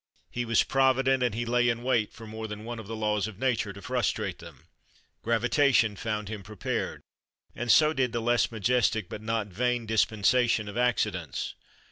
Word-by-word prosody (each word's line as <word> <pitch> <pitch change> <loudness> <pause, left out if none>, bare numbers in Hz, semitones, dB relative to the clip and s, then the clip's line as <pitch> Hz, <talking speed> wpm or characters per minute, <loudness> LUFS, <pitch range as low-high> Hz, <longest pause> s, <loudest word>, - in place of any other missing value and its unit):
He 120 0 -2
was 115 -1 +3
provident, 135 0 +2
and 120 -4 +1
he 120 +1 -2
lay 120 0 +2
in 120 0 -2
wait 120 -5 +1
for 115 - -12
more 110 0 -6
than 105 0 -7
one 120 0 -5
of 110 - -9
the 115 - -5
laws 105 -2 0
of 110 -4 -9
nature, 120 -4 0
to 100 0 -12
frustrate 110 -7 -1
them. 80 -5 -13 0.6
Gravitation 115 -1 +2
found 105 0 -3
him 105 -1 -6
prepared, 100 0 -4 0.5
and 120 0 0
so 155 +6 +6
did 130 -4 0
the 120 - -1
less 120 +1 +2
majestic 110 -2 +1
but 105 - -7
not 110 -1 -2
vain 120 +4 -1
dispensation 110 +1 +2
of 105 - -7
accidents. 105 - -1
115 Hz, 180 wpm, -28 LUFS, 105-120 Hz, 0.6 s, so